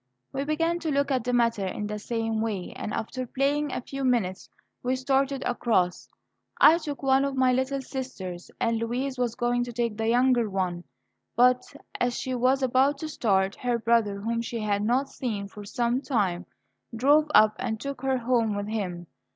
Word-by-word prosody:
We 275 +1 -2
began 330 +3 0
to 330 - -3
look 280 -1 +1
at 255 -3 +1
the 250 - -1
matter 230 -4 +2
in 210 - -4
the 210 0 -4
same 225 0 -2
way, 205 -5 -3
and - - -5
after 255 +4 -4
playing 285 +3 0
a - - -3
few 275 +2 -6
minutes, 225 -8 0 0.3
we 255 +1 0
started 270 +1 0
across. 215 -7 0 0.5
I 330 +2 +7
took 295 -4 -6
one 270 0 +4
of 275 -1 -1
my 260 -1 +3
little 265 +2 -1
sisters, 190 -11 -6
and 230 0 +1
Louise 250 +3 -2
was 240 -2 0
going 245 0 +1
to 245 - -6
take 235 -2 -2
the 225 0 -1
younger 245 -1 +3
one; 180 -3 -2 0.5
but, 250 +1 +5 0.4
as 245 0 0
she 260 - -3
was 255 +2 +2
about 260 +3 +3
to 315 - -5
start, 195 -8 +1
her 245 -1 0
brother, 225 -3 +1
whom 230 +2 -1
she 230 0 -4
had 205 -1 0
not 250 +5 +1
seen 215 -7 -4
for 205 +1 -10
some 240 +4 0
time, 190 -10 -1 0.5
drove 290 +6 +4
up 215 0 +6
and 220 -1 -2
took 280 +1 -5
her 265 -1 +1
home 235 -3 +1
with 205 +1 -3
him. 180 -6 -3
245 Hz, 190 wpm, -26 LUFS, 215-265 Hz, 0.5 s, I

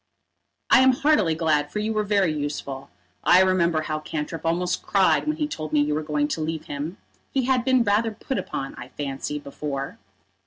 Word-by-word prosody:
"I 270 - +8
am 260 0 +6
heartily 250 - +2
glad, 150 -3 +1
for - - -4
you 215 +1 -1
were 215 - +1
very 200 -5 +2
useful. 145 -2 -4 0.3
I 180 +1 +6
remember 170 -4 +2
how 155 0 -2
Cantrip 155 +1 -4
almost 180 +2 0
cried 195 +8 +2
when 305 0 0
he 300 -2 0
told 155 - -5
me 150 - +3
you 150 +1 +1
were 155 - 0
going 150 -1 0
to 160 - -2
leave 160 0 -3
him. 150 +7 -5 0.3
He 265 -2 0
had 255 -2 +2
been 255 -1 +3
rather 210 +2 +2
put 240 +4 -4
upon, 135 - -5
I - - -8
fancy, 140 +1 -3
before." 140 -1 -5
165 Hz, 195 wpm, -24 LUFS, 150-210 Hz, 0.3 s, I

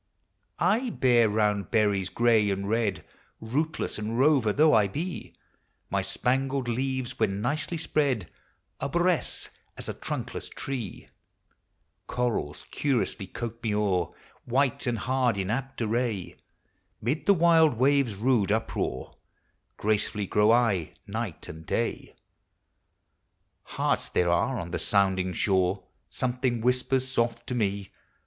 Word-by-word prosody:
I 220 +8 +2
bear 120 - +3
round 105 -2 +1
berries, 100 -4 +2
gray 110 0 +3
and 100 0 -2
red, 110 -2 0 0.3
Rootless 145 +4 -2
and 110 +2 -3
rover 135 -5 +4
though 155 +6 +4
I 105 -3 +5
be; 165 - -5 0.6
My - - +1
spangled 135 +1 0
leaves, 130 +1 -2
when 95 +1 +1
nicely 150 +8 -1
spread, 140 - 0 0.5
Aiboresce 175 +3 0 0.3
as - - -4
a - - -3
trunkless - - -5
tree; 125 -8 -5 1.0
Corals 120 -12 -2
curious 135 -5 0 0.2
coat 115 -1 -5
me 110 -3 -1
o'er, 95 -5 +1 0.3
White 130 +1 +1
and 120 -1 0
hard 125 0 +1
in 95 +1 -1
apt 135 0 -3
array; 110 -3 -1 0.6
Mid 130 +8 -2
the 200 - +6
wild 165 -4 +5
waves' 135 -2 +2
rude 110 -2 +2
uproar 110 - -2 0.6
Gracefully 105 -1 0
grow 105 +3 +3
I, 115 -8 +2
night 105 -3 -5
and 80 +1 -9
day. - - -2 1.6
Hearts - - 0
there 90 -1 +2
are 125 +9 +1
on 85 -4 -5
the - - -2
sounding 95 -2 +2
shore, 95 +1 +1 0.3
Something 125 -1 -1
whispers 125 +2 +1
soft 115 -2 -1
to - - -4
me. 100 -4 -1
115 Hz, 125 wpm, -27 LUFS, 100-130 Hz, 1.6 s, the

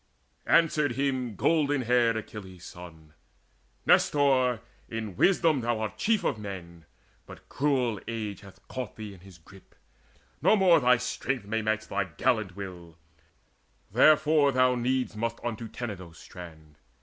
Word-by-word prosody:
Answered 150 -5 +3
him 130 -3 -1
golden 145 - +1
haired 120 -1 +3
Achilles' 95 -5 -9
son: 80 -3 -12 0.7
"Nestor, 130 -5 +3 0.3
in 110 -4 -5
wisdom 160 - +3
art 120 -1 0
thou - - -25
chief 220 - +1
of 110 - -1
men; 85 -6 -9 0.4
But - - -13
cruel 130 -7 0
age 110 -4 -4
hath 95 -1 -16
caught 130 -3 -6
thee 105 -2 -8
in 95 - -14
his 95 -1 -15
grip: 95 +3 -18 0.7
No - - +5
more 185 -5 +5
thy 125 -2 +4
strength 125 -1 -3
may 110 +2 -1
match 110 0 -1
thy 100 -1 -1
gallant 105 +2 -1
will; 90 -4 -9 0.9
Therefore 155 -1 +5
thou 130 -1 +3
needs 125 0 -1
must 115 +1 -3
unto 115 -1 -4
Tenedos' 95 -8 -7
strand. 80 -4 -12
115 Hz, 135 wpm, -28 LUFS, 95-130 Hz, 0.9 s, No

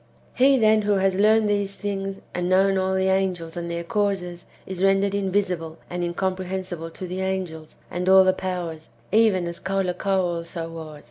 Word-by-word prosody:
He, 270 +1 +5
then, 220 -2 +4
who 205 0 +1
has 195 -1 +2
learned 215 +3 +4
[these 200 -1 0
things], 195 -1 -4
and 180 0 -1
known 195 +1 +4
all 190 0 0
the 190 0 +2
angels 185 -4 0
and 170 -1 -4
their 170 0 -3
causes, 180 -2 -2 0.2
is 190 0 -4
rendered 195 0 +3
invisible 185 -5 -1
and 175 0 -3
incom 180 +2 -1
prehensible 185 -3 -5
to 185 - -6
the 185 +1 -4
angels 185 -5 -4 0.2
and 180 +1 -1
all 190 0 +8
the 185 0 +3
powers, 175 -4 -5 0.2
even 210 -4 +4
as 170 0 -4
Caulacau 195 0 0
also 170 -1 -4
was. 160 -2 -8
190 Hz, 180 wpm, -24 LUFS, 175-195 Hz, 0.2 s, all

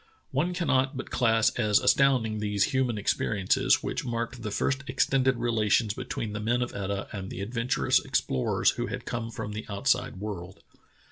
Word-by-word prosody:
One 165 +7 0
cannot 135 -5 +1
but 130 - -6
class 115 -2 +3
as 105 -3 +4
astounding 125 -6 +3
these 105 -1 +1
human 130 -4 +1
experiences, 100 -1 +1
which - - -2
marked 120 0 -3
the 110 - -3
first 135 +6 -1
extended 130 -3 +2
relations 115 -2 +1
betvv'een 110 -1 -4
the 105 - -3
men 120 +3 +1
of 120 - -5
Etah 100 0 -3
and 95 -2 -6
the - - -6
adventurous 115 +4 +1
explorers 65 - +1
who - - -3
had - - -5
come 115 -1 -3
from 105 -2 -5
the 105 +1 -5
outside 125 +4 0
world. 95 -3 -7
115 Hz, 165 wpm, -28 LUFS, 105-125 Hz, -, as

